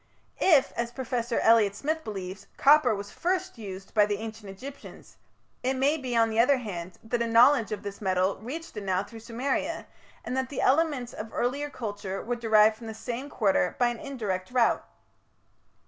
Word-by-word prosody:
If, 305 -8 +5
as 235 0 -3
Professor 245 -2 -2
Elliot 220 -3 +5
Smith 315 +7 -2
believes, 190 -2 -6
copper 280 -5 +5
was 200 0 -7
first 370 -4 -2
used 195 -2 -8
by 210 -1 +5
the 205 -1 -1
Ancient 220 -1 -8
Egyptians, 265 +9 -11 0.4
it 260 +2 0
may 275 +4 +2
be, 260 -5 -4
on 225 -1 +4
the 220 - 0
other 260 +4 +5
hand, 185 -7 -6
that 235 +1 -2
a 235 - +1
knowledge 230 0 +5
of 215 - -4
this 200 0 -7
metal 185 0 +1
reached 300 +9 -7
Anau 195 -1 -1
through 230 - -10
Sumeria, 265 +8 -2 0.4
and 250 - -3
that 260 0 -1
the 280 - -5
elements 280 -4 +2
of 215 +1 -6
the - - -14
earlier 280 +4 -1
culture 205 -6 -5
were 245 +2 -2
derived 220 -2 +4
from 230 0 -10
the 220 - -6
same 240 +5 -5
quarter 195 -7 +1
by 245 -1 +3
an 240 -1 -5
indirect 200 -9 -4
route. 245 -2 +2
230 Hz, 185 wpm, -27 LUFS, 205-265 Hz, 0.4 s, If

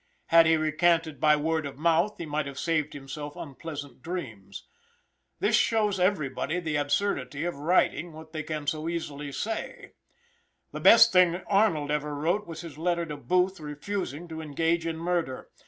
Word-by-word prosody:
Had 165 0 +7
he 160 0 +4
recanted 160 0 +1
by 150 0 +5
word 160 0 -1
of 135 - -10
mouth 170 +6 +2
he 170 - -5
might 150 -1 -2
have 140 -1 -8
saved 155 -2 0
himself 145 +1 -7
unpleasant 145 -3 -8
dreams. 110 - -7 0.7
This - - +3
shows 210 -4 +2
everybody 170 -3 0
the 160 -3 -3
absurdity 145 -1 -1
of 175 - -1
writing 170 +1 +1
what 160 +1 -12
they 155 - -3
can 155 -1 -5
so 155 +3 -2
easily 150 -4 -4
say. 220 +10 -5 0.8
The - - -6
best - - +8
thing 180 -1 +4
Arnold 195 -8 +2
ever 150 0 -1
wrote 175 +8 0
was 165 - -7
his 160 -4 -10
letter 170 0 0
to 150 -2 -6
Booth 180 +8 +1
refusing 155 +1 -5
to 160 0 -6
engage 165 +2 0
in 165 -1 -3
murder. 170 -6 -2
160 Hz, 165 wpm, -27 LUFS, 145-175 Hz, 0.8 s, best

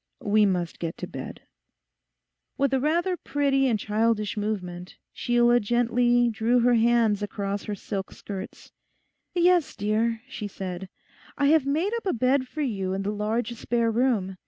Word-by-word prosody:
'We 210 0 +3
must 175 -3 -2
get 165 -1 -4
to - - -5
bed.' - - -8 1.1
With 275 -1 +1
a 265 - +3
rather 340 +6 +1
pretty 275 -3 +1
and 230 -4 +2
childish 215 0 0
movement, 185 -4 -4 0.2
Sheila 240 0 +3
gently 240 +2 +2
drew 235 +2 +2
her 245 +1 +4
hands 230 -3 +3
across 200 -1 -3
her 210 - -3
silk 195 0 -5
skirts. 195 -1 -8 0.6
'Yes, 350 -3 +3
dear,' 220 +2 0
she 220 -5 -6
said, 190 -1 -6 0.5
'I 285 - +2
have 310 -3 +4
made 325 +10 0
up 460 - -6
a - - +2
bed 255 +2 +1
for 310 - -5
you 195 -7 -2
in 195 +1 -2
the 205 - -1
large 215 +3 -2
spare 235 0 0
room. 220 -6 0
230 Hz, 160 wpm, -26 LUFS, 205-255 Hz, 1.1 s, her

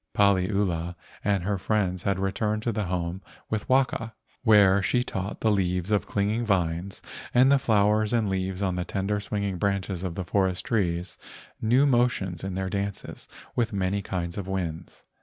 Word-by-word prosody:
Paliula 95 -4 +2 0.3
and 100 -3 +1
her 100 0 -1
friends 90 -3 0
had 100 -2 0
returned 105 +3 -1
to 120 - 0
the 105 -1 -2
home 90 0 -3 0.3
with 110 -1 -2
Waka, 125 -4 +1 0.3
where 100 -4 +6
she 120 +5 +1
taught 95 -3 -4
the 110 - +3
leaves 90 -1 0
of 105 - +1
clinging 105 +3 0
vines 90 -3 -1 0.3
and 130 +3 +6
the 140 - +5
flowers 105 -2 +2
and 115 -3 +2
leaves 95 0 -2
on 95 -2 +1
the 90 - -1
tender 100 +2 -1
swinging 100 -2 -2
branches 100 -2 -1
of 90 -3 -4
the 95 - -4
forest 95 0 0
trees 90 -8 -1 0.4
new 125 +5 +4
motions 120 - +1
in 95 -1 -3
their 95 0 -2
dances 100 +1 -4 0.3
with 120 -2 +1
the 105 - -7
many 95 +1 0
kinds 90 -1 -4
of 95 - -5
winds. 90 -4 -4
100 Hz, 175 wpm, -26 LUFS, 90-105 Hz, 0.4 s, where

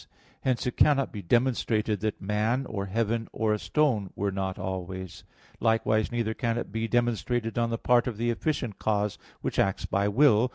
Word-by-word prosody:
Hence 130 -2 0
it 125 - -2
cannot 140 -2 +4
be 105 - -5
demonstrated 110 -1 +1
that 110 +1 -2
man, 105 +6 0
or 100 -4 -4
heaven, 115 +2 -1
or 110 -1 +1
a 105 - -1
stone 125 -11 +1
were 100 0 -1
not 95 -1 -3
always. 95 0 -5 0.4
Likewise 110 -1 +2
neither 115 -2 -1
can 115 0 -1
it 120 - -4
be 115 +2 -1
demonstrated 120 -1 0
on 115 0 +1
the 115 - -1
part 120 +1 +3
of 115 -4 -3
the 120 +1 +1
efficient 120 -4 -2
cause, 105 -1 0 0.2
which - - -2
acts 95 -1 +1
by 100 +1 +1
will. 120 +1 +4
110 Hz, 180 wpm, -28 LUFS, 100-120 Hz, 0.4 s, cannot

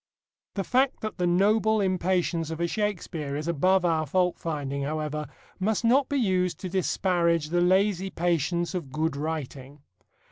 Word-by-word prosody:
The 195 - -1
fact 260 +6 +1
that 215 -2 -5
the 180 - +2
noble 215 +4 +3
impatience 180 -3 0
of 160 0 -5
a 170 - +1
Shakespeare 170 -7 -3
is 150 +2 -4
above 180 +3 +2
our 160 -2 +1
fault 180 +3 +1
finding, 140 -4 -3
however, 150 +1 -3 0.3
must 215 +4 0
not 260 +4 +4
be 285 - 0
used 180 - +1
to 185 - -4
disparage 175 -4 +1
the 175 +1 +1
lazy 190 +1 +2
patience 175 0 0
of 165 -8 -4
good 155 +1 -1
writing. 145 -2 -5
175 Hz, 155 wpm, -26 LUFS, 155-190 Hz, 0.3 s, not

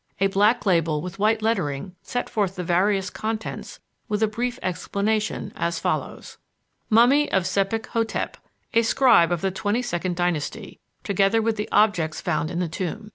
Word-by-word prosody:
A 195 - +3
black 205 +5 +2
label 165 -5 +2
with 180 +4 -7
white 215 +1 +2
lettering 180 -6 -1
set 245 - -3
forth 200 -5 -1
the 180 - -4
various 195 +3 +1
contents 220 0 -5 0.3
with 210 +1 0
a - - +4
brief 240 +3 -3
explanation 210 +4 -2
as 170 0 -1
follows: - - -3 0.5
"Mummy 250 +7 +4
of 190 - +2
Sebek 195 +4 0
hotep, 225 -1 -2 0.4
a 230 - +5
scribe 225 -7 +4
of 175 -2 0
the 195 - 0
twenty 205 +5 -1
second 180 -5 -2
dynasty, 175 +4 -3 0.2
together 200 +2 +2
with 225 0 0
the 210 0 -4
objects 180 -8 +2
found 155 -2 -1
in 170 - -4
the 180 -1 0
tomb. 180 +5 -5
200 Hz, 165 wpm, -24 LUFS, 175-220 Hz, 0.5 s, a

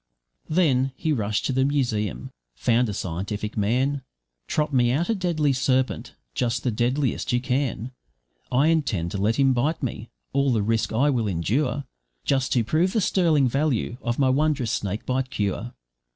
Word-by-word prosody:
Then 135 -6 +2
he 155 +2 0
rushed 105 -4 -1
to 135 - 0
the 130 +1 +2
museum, 110 - -1 0.2
found 115 - +2
a - - -1
scientific 100 +4 -4
man 130 +7 +1 0.5
`Trot 150 -1 0
me 120 -2 +4
out 160 - 0
a - - +3
deadly 170 -8 +1
serpent, 130 0 0 0.2
just 120 - -1
the 125 - +1
deadliest 125 +5 0
you 125 - +2
can; 130 -2 -1 0.6
I 140 +5 +4
intend 120 - 0
to 100 - -3
let 105 +3 +2
him 135 0 +4
bite 145 +6 0
me, 115 -3 -4 0.2
all 140 0 +2
the 110 -4 +1
risk 110 0 0
I 135 +6 +3
will 115 -5 0
endure, 120 - 0 0.4
Just 135 -2 +1
to 120 - +3
prove 165 - +1
the 225 - +2
sterling 165 -9 +3
value 135 -2 0
of 120 -1 -2
my 135 -2 +3
wondrous 140 -4 +1
snakebite 125 +7 -2
cure. 105 -1 -2
125 Hz, 165 wpm, -24 LUFS, 110-140 Hz, 0.6 s, me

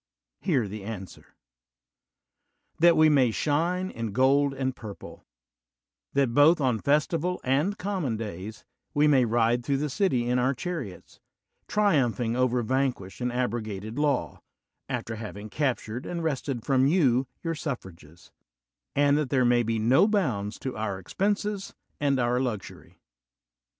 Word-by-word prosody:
Hear 135 - +1
the 105 +1 -7
answer: 95 -4 -9 1.4
That 170 0 +6
we 155 0 +6
may 135 -5 +4
shine 170 - 0
in 115 -3 -5
gold 140 +3 +3
and 130 -1 -2
purple; 105 -5 -10 0.9
that, 135 -4 +2
both 150 +6 +6
on 125 -5 +1
festival 155 +6 +1
and 150 +11 +1
common 180 - -2
days, 105 0 -7 0.3
we 150 +1 +4
may 135 -4 +4
ride 120 +1 +2
through 140 +2 0
the 150 +1 -2
city 130 - +1
in 125 +1 +2
our 130 +2 +1
chariots, 130 - -6 0.5
triumphing 130 - +1
over 125 -1 +1
vanquished 125 -5 -2
and 125 0 0
abrogated 110 -2 -3
law, 145 -3 0 0.5
after 115 -1 -3
having 105 -1 -8
captured 125 -4 -2
and 170 -1 -4
wrested 135 -5 -2
from 135 -1 +3
you 135 -6 +3 0.2
your 165 -1 -1
suffrages; 95 - -8 0.6
and 145 +1 +4
that 150 -4 -2
there 130 -2 +2
may 120 0 +4
be 115 -1 -1
no 125 - +4
bounds 125 - -1
to 130 - -5
our 110 -3 -3
expenses 200 - -2 0.2
and 140 -2 +1
our 120 0 +1
luxury. 120 -7 -5
130 Hz, 140 wpm, -27 LUFS, 115-150 Hz, 1.4 s, That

